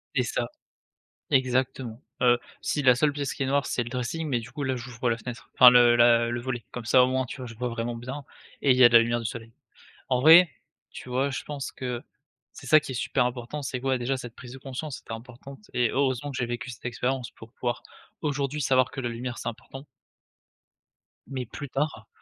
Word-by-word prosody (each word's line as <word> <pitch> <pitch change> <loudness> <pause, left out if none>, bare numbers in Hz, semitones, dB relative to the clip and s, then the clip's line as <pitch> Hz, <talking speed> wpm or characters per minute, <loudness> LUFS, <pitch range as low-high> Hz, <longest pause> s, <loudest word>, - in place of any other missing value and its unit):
C'est - - +3
ça. - - -2 0.8
Exactement. 130 -3 0 0.2
Heu, 120 -1 +5 0.2
si, 145 - -1
la 125 -2 +6
seule 145 +4 +2
pièce 140 -1 -3
qui - - -3
est - - 0
noire 140 0 +1
c'est 120 - -1
le 120 - -6
dressing, 125 +6 -3
mais 125 -4 +1
du 115 +2 -9
coup 145 - -5
là, 130 -1 -1
j'ouvre 120 0 -3
la 115 - +1
fenêtre 120 +1 -8
enfin 125 -1 +10
le 120 -1 +6
la 120 0 +5
le 120 - -2
volet, 125 -1 -4
comme 120 -2 -7
ça 125 +2 +5
au 125 - +3
moins, 130 0 0
tu 135 - -8
vois, 125 - -6
je 115 - -9
vois 125 +2 -3
vraiment 115 0 -3
bien, 130 +4 -7 0.4
et 140 - +3
il 125 - +6
y 130 - +7
a - - +10
de 120 - -4
la 115 - +8
lumière 120 +1 0
du 115 - -3
soleil. 115 +1 -7 0.6
En 125 -1 +2
vrai, 165 +4 +8 0.4
tu - - -10
vois, 130 +3 0
je 130 - -4
pense 145 -2 -5
que 125 -2 -4 0.5
c'est - - -12
ça 155 0 +6
qui 135 - -7
est - - -6
super 125 +1 +1
important, 125 +4 -4
c'est 130 -2 -4
que, 135 - -7
ouais, 130 -1 +2
déjà 130 +2 -1
cette 120 -2 -8
prise 125 -2 -11
de 135 - -9
conscience 135 +2 -6
était - - -10
importante 125 - -11
et 120 -2 +2
heureusement 135 0 0
que 130 - -6
j'ai 125 - -1
vécu 120 +2 -5
cette 120 - -12
expérience 125 +1 -2
pour 115 +1 -15
pouvoir 120 -1 -3 0.4
aujourd'hui 145 -1 -2
savoir 130 -2 +3
que 135 - -6
la 125 - -2
lumière, 120 +1 -5
c'est - - -4
important. 130 +4 -9 1.4
Mais 130 -3 -4
plus 140 +4 -8
tard, 135 -6 -2
125 Hz, 235 wpm, -26 LUFS, 120-135 Hz, 1.4 s, enfin